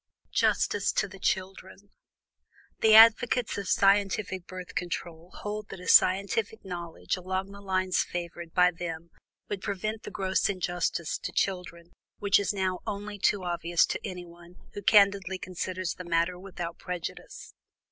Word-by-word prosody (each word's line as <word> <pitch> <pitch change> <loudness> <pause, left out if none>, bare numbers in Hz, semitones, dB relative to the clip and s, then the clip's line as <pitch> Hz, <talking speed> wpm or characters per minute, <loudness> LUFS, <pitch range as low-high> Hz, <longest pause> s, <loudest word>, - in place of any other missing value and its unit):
JUSTICE 205 0 +1
TO - - +1
THE 195 0 -13
CHILDREN. 190 +1 -3 0.9
The 220 -1 +6
advocates 230 +1 +6
of 200 - -5
scientific 195 -2 +2
Birth 185 -1 -8
Control 170 -1 -5
hold 210 0 -5
that - - -8
a 180 - -10
scientific 200 +4 +3
knowledge 175 0 -4
along 190 +2 -3
the 200 0 -11
lines 185 -1 +1
favored 170 -1 -5
by 180 +1 +4
them 170 -1 -6 0.4
would 200 -2 -4
prevent 215 +3 -3
the - - -7
gross 190 0 0
injustice 175 -3 -2
to - - -5
children 180 -3 -2 0.3
which 200 -1 +3
is 200 +1 0
now 190 -2 -1
only 205 0 -5
too 195 0 +2
obvious 175 -1 +1
to - - -3
anyone 175 -1 -9 0.2
who 205 - -6
candidly 195 -2 +4
considers 185 0 -4
the 180 - -9
matter 170 +1 0
without 180 -3 -7
prejudice. 180 -2 -7
185 Hz, 145 wpm, -28 LUFS, 175-200 Hz, 0.9 s, The